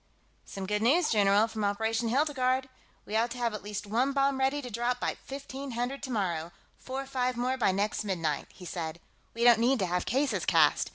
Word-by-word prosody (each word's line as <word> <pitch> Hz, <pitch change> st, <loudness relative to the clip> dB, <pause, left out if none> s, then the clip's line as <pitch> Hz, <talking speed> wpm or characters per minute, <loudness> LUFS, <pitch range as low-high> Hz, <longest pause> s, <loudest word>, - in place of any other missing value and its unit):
"Some 195 Hz, -1 st, -6 dB
good 210 Hz, +2 st, -1 dB
news, 300 Hz, +9 st, +3 dB
general, 205 Hz, 0 st, +4 dB
from 220 Hz, -1 st, -4 dB
Operation 225 Hz, +3 st, 0 dB
'Hildegarde.' 260 Hz, -1 st, +1 dB, 0.4 s
We 210 Hz, -, -5 dB
ought 230 Hz, +2 st, +2 dB
to 240 Hz, -, -7 dB
have 235 Hz, -2 st, 0 dB
at 210 Hz, -, -5 dB
least 210 Hz, 0 st, -5 dB
one 245 Hz, +7 st, +1 dB
bomb 275 Hz, -1 st, +2 dB
ready 270 Hz, +2 st, +1 dB
to 250 Hz, -4 st, -7 dB
drop 240 Hz, +3 st, -1 dB
by -, -, -1 dB
1500 270 Hz, -1 st, -4 dB
tomorrow, 180 Hz, -, -2 dB, 0.3 s
four 265 Hz, +1 st, -4 dB
or -, -, -7 dB
five 255 Hz, -2 st, -1 dB
more 250 Hz, +2 st, 0 dB
by 235 Hz, -7 st, +2 dB
next 205 Hz, +3 st, -1 dB
midnight," 165 Hz, -7 st, -2 dB
he 180 Hz, -, -12 dB
said. 170 Hz, -1 st, -5 dB, 0.4 s
"We 230 Hz, -, -1 dB
don't 240 Hz, -2 st, +7 dB
need 255 Hz, +4 st, +3 dB
to 195 Hz, -, 0 dB
have 180 Hz, 0 st, -1 dB
cases 275 Hz, +3 st, +1 dB
cast. -, -, +4 dB
235 Hz, 205 wpm, -29 LUFS, 205-265 Hz, 0.4 s, don't